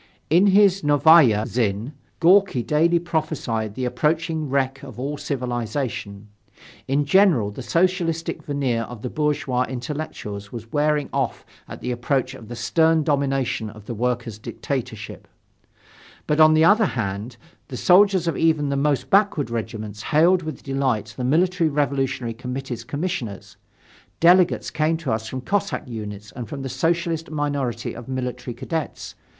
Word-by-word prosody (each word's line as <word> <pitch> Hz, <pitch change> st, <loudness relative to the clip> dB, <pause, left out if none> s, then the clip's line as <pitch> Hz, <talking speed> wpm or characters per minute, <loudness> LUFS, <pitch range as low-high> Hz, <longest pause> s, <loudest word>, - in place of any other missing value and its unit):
In 180 Hz, +5 st, +5 dB
his 195 Hz, -1 st, +5 dB
Novaya 145 Hz, -7 st, +5 dB
Zhizn, 110 Hz, +1 st, -1 dB, 0.3 s
Gorki 180 Hz, -7 st, +4 dB
daily 165 Hz, +5 st, +3 dB
prophesied 155 Hz, -11 st, -2 dB
the 130 Hz, -, -2 dB
approaching 160 Hz, +3 st, -1 dB
wreck 135 Hz, -1 st, 0 dB
of 130 Hz, -3 st, -10 dB
all 140 Hz, +3 st, -3 dB
civilization. 120 Hz, -6 st, -4 dB, 0.6 s
In 140 Hz, +2 st, +1 dB
general, 160 Hz, -, +4 dB
the 120 Hz, -, -8 dB
Socialistic 165 Hz, +3 st, 0 dB
veneer 135 Hz, -5 st, -1 dB
of 120 Hz, -3 st, -10 dB
the 125 Hz, -, -4 dB
bourgeois 145 Hz, -4 st, 0 dB
intellectuals 120 Hz, -6 st, -6 dB
was 115 Hz, -1 st, -8 dB
wearing 150 Hz, -1 st, +1 dB
off -, -, -2 dB, 0.2 s
at -, -, -9 dB
the 125 Hz, -, -3 dB
approach 130 Hz, +1 st, -1 dB
of 115 Hz, -4 st, -11 dB
the 120 Hz, -, -7 dB
stern 160 Hz, +6 st, +2 dB
domination 135 Hz, -6 st, 0 dB
of 105 Hz, -1 st, -13 dB
the 120 Hz, -, -5 dB
workers' 120 Hz, -1 st, -2 dB
dictatorship. 110 Hz, -3 st, -5 dB, 1.0 s
But, 150 Hz, +1 st, 0 dB
on 155 Hz, 0 st, +7 dB
the 160 Hz, +1 st, +5 dB
other 215 Hz, +4 st, +5 dB
hand, 110 Hz, -, -4 dB, 0.3 s
the -, -, -6 dB
soldiers 190 Hz, -1 st, +4 dB
of 165 Hz, -, 0 dB
even 155 Hz, -3 st, +2 dB
the 140 Hz, -, 0 dB
most 140 Hz, 0 st, 0 dB
backward 195 Hz, -, +3 dB
regiments 110 Hz, -2 st, -5 dB
hailed 170 Hz, +8 st, +3 dB
with 155 Hz, -5 st, -7 dB
delight 130 Hz, -6 st, -1 dB
the 125 Hz, -, -4 dB
Military 170 Hz, +5 st, +2 dB
Revolutionary 135 Hz, -4 st, -1 dB
Committee's 125 Hz, 0 st, -5 dB
commissioners. 140 Hz, -, -4 dB, 0.6 s
Delegates 175 Hz, +1 st, +4 dB
came 160 Hz, +1 st, +1 dB
to 155 Hz, -5 st, -3 dB
us 110 Hz, -1 st, -2 dB
from 130 Hz, +3 st, -5 dB
Cossack 200 Hz, +3 st, -2 dB
units 105 Hz, -3 st, -7 dB
and 120 Hz, -3 st, -7 dB
from 140 Hz, -3 st, -6 dB
the 135 Hz, -, -4 dB
Socialist 165 Hz, +2 st, -1 dB
minority 140 Hz, -6 st, -2 dB
of 120 Hz, -, -9 dB
military 125 Hz, -2 st, -4 dB
cadets. 160 Hz, +5 st, -5 dB
135 Hz, 145 wpm, -23 LUFS, 120-160 Hz, 1.0 s, on